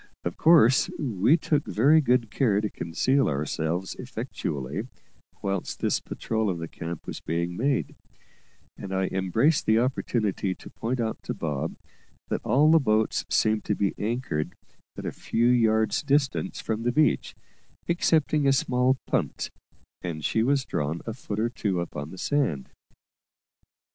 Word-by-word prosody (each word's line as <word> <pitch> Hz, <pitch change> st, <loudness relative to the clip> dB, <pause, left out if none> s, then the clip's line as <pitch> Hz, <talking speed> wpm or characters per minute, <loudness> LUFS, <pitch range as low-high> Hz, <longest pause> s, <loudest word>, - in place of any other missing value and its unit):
Of 85 Hz, -, -3 dB
course 150 Hz, -6 st, +5 dB
we 125 Hz, -, +2 dB
took 150 Hz, -2 st, 0 dB
very 145 Hz, +8 st, +4 dB
good 125 Hz, -5 st, +1 dB
care 110 Hz, -7 st, +2 dB
to 105 Hz, -1 st, -2 dB
conceal 130 Hz, +12 st, +1 dB
ourselves 80 Hz, +5 st, -2 dB
effectually 70 Hz, -, -4 dB, 0.6 s
whilst 95 Hz, -2 st, -2 dB
this -, -, +1 dB
patrol 110 Hz, -2 st, -2 dB
of 90 Hz, -, -1 dB
the 85 Hz, 0 st, -5 dB
camp 85 Hz, 0 st, -7 dB
was -, -, -6 dB
being 85 Hz, +2 st, -2 dB
made, 135 Hz, +6 st, 0 dB, 0.8 s
and 95 Hz, -1 st, -5 dB
I 95 Hz, 0 st, 0 dB
embraced 95 Hz, -, +1 dB
the 110 Hz, -, +5 dB
opportunity 110 Hz, -6 st, 0 dB
to -, -, -12 dB
point 125 Hz, +3 st, -3 dB
out 110 Hz, -1 st, -2 dB
to -, -, -4 dB
Bob 75 Hz, -4 st, -3 dB, 0.5 s
that -, -, -1 dB
all 145 Hz, +7 st, +4 dB
the 165 Hz, -, +7 dB
boats 110 Hz, -5 st, +1 dB
seemed 110 Hz, 0 st, +2 dB
to 105 Hz, -, 0 dB
be 100 Hz, -1 st, 0 dB
anchored 105 Hz, -8 st, -2 dB, 0.4 s
at -, -, -6 dB
a -, -, -2 dB
few 115 Hz, -, -1 dB
yards' 110 Hz, -3 st, +3 dB
distance 140 Hz, -1 st, 0 dB
from 110 Hz, 0 st, -2 dB
the 120 Hz, +1 st, +1 dB
beach, 150 Hz, +4 st, +2 dB, 0.5 s
excepting 155 Hz, -4 st, +2 dB
a 135 Hz, -, +5 dB
small 130 Hz, 0 st, +2 dB
punt, -, -, -1 dB, 0.5 s
and 80 Hz, -4 st, -4 dB
she 110 Hz, -, +1 dB
was 135 Hz, +2 st, +2 dB
drawn 75 Hz, +3 st, -2 dB
a 115 Hz, -, -3 dB
foot 110 Hz, -3 st, -5 dB
or 115 Hz, +2 st, +1 dB
two 100 Hz, -7 st, -1 dB
up 85 Hz, -, -5 dB
on 75 Hz, 0 st, -5 dB
the 95 Hz, -, -10 dB
sand. 90 Hz, -, -1 dB
110 Hz, 155 wpm, -26 LUFS, 90-130 Hz, 0.8 s, the